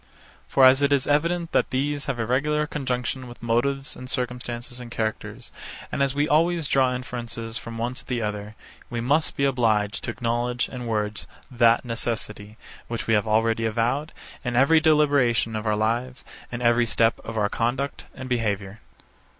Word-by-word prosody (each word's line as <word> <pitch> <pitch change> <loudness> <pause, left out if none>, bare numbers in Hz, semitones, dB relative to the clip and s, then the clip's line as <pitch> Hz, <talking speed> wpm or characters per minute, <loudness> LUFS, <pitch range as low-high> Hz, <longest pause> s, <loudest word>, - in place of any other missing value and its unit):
For 135 - +5
as 130 +2 +7
it 140 0 +3
is 140 -2 +3
evident 170 +3 +1
that - - +2
these 145 +3 -1
have 135 -3 -1
a 115 - -1
regular 150 +5 +1
conjunction 130 -3 -3
with 120 -1 -12
motives 135 +5 0
and 130 0 -9
circumstances 125 -1 -3
and 120 -1 -8
characters, 110 -2 -4 0.4
and - - -2
as 140 0 +1
we 145 +1 +2
always 165 +1 +2
draw 130 -2 +3
inferences 120 -3 -5
from 115 0 -8
one 120 +2 -2
to - - -11
the 125 -2 -1
other, 105 -1 -4 0.3
we 120 - -3
must 145 +7 +1
be 140 - +2
obliged 110 -6 +1
to - - -3
acknowledge 120 +1 -1
in 125 -2 -7
words 105 -2 -2 0.2
that 120 -1 +4
necessity, 110 -2 -4 0.3
which 115 -1 -4
we 115 - +1
have 105 0 +2
already 115 +1 +2
avowed, 120 +8 0 0.3
in 120 -2 -2
every 145 +6 +5
deliberation 145 -8 +3
of 110 +1 -3
our 105 - +2
lives, 120 +4 -1 0.3
and 120 0 -4
in - - +5
every 120 0 +3
step 115 +1 +2
of 115 0 -6
our 105 -1 +2
conduct 125 +6 -2
and 130 -1 -7
behaviour. 105 -4 -2
120 Hz, 180 wpm, -25 LUFS, 115-135 Hz, 0.4 s, as